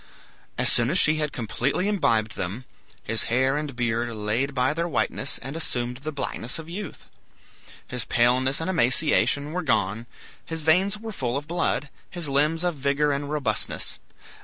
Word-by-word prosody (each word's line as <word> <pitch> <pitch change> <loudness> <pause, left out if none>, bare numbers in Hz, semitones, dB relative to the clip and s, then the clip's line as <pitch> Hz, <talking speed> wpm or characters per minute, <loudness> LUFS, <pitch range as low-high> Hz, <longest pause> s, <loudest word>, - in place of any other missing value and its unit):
As - - +3
soon 120 0 +3
as 180 - +5
he 155 0 +2
had 150 -1 -1
completely 130 - -1
imbibed 115 - +1
them, 100 +8 -4 0.4
his 115 0 +1
hair 130 +3 +2
and 150 -3 -3
beard 120 0 0
laid 115 +5 -1
by 130 +3 +2
their 170 +2 -1
whiteness 140 -4 0
and 135 +4 -7
assumed 125 -6 -1
the 145 +4 -5
blackness 135 -4 -2
of 160 -1 -8
youth; 190 +4 -7 0.8
his 125 -2 -2
paleness 125 +3 +3
and 165 - -3
emaciation 150 -2 +2
were 180 +2 -2
gone; 110 - 0 0.4
his 160 -1 -3
veins 185 +6 +3
were 225 +1 -7
full 130 - -2
of 145 +1 -6
blood, 165 -3 0 0.2
his 175 -4 -3
limbs 150 +4 +2
of 175 -4 -1
vigor 140 +2 +1
and 140 0 -2
robustness. 135 -8 -1
140 Hz, 165 wpm, -25 LUFS, 120-160 Hz, 0.8 s, as